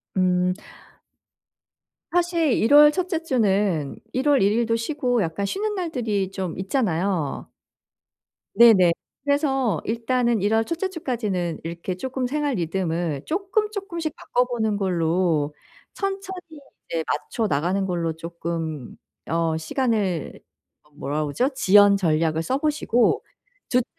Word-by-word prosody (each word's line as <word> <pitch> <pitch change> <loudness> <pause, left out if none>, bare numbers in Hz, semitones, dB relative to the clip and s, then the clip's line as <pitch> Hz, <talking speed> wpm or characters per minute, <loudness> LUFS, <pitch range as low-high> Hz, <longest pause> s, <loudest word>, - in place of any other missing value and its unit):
음. 180 -1 +2 1.6
사실 340 -3 +2
1 230 +6 +3
월 295 0 +9
첫째 355 0 -2
주는 200 - +1 0.2
1 260 +2 -1
월 285 -2 +4
1 200 +1 +3
일도 230 0 +1
쉬고 245 -1 0
약간 165 +3 -2
쉬는 420 - -2
날들이 230 - -2
좀 185 -4 -4
있잖아요. 185 - -1 1.1
네네. 210 -6 +7 0.3
그래서 270 - +1
일단은 235 0 0
1 205 +2 +1
월 225 0 +3
첫째 340 - -2
주까지는 215 - -3
이렇게 170 +2 -4
조금 260 +5 -3
생활 290 0 -1
리듬을 170 -4 -2
조금 390 +4 0
조금씩 340 -7 -4
바꿔 250 +1 0
보는 220 -4 -1
걸로 170 -5 +1 0.4
천천히 380 -5 -5 0.3
네 165 -1 -1
맞춰 150 +9 -2
나가는 180 +6 0
걸로 170 -3 -1
조금 165 -4 -5 0.3
어 165 -1 0
시간을 195 - -1 0.6
뭐라 145 +2 -2
그러죠? 245 - 0
지연 205 -5 +5
전략을 160 -2 +1
써 260 +11 -1
보시고 290 -5 +1 0.5
둘째 250 -2 +2
210 Hz, 235 characters per minute, -23 LUFS, 170-275 Hz, 1.6 s, 월